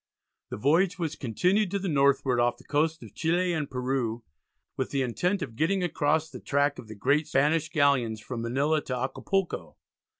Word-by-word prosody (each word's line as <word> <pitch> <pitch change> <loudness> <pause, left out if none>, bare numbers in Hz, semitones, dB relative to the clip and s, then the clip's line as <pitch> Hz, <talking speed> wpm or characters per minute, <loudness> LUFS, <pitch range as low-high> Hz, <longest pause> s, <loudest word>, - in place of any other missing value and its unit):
The - - -5
voyage 165 - +2
was 160 -4 -2
continued 180 - +1
to 200 - -1
the 195 0 -3
northward 140 -4 +2
off 120 0 +2
the - - -17
coasts 160 +2 0
of - - -12
Chile 175 +2 +1
and 155 -4 -2
Peru 125 -3 -2 0.5
with - - -2
the 135 -2 0
intention 175 - -1
of 115 - -17
getting 180 +8 +1
across 155 -2 +1
the - - -10
track 145 +1 0
of 115 - -10
the 110 - -9
great 140 +8 +1
Spanish 155 +4 +2
galleons 140 -8 +2
from 115 +2 -6
Manila 140 +6 +1
to 125 - -2
Acapulco. 180 +9 -2
145 Hz, 180 wpm, -27 LUFS, 125-165 Hz, 0.5 s, voyage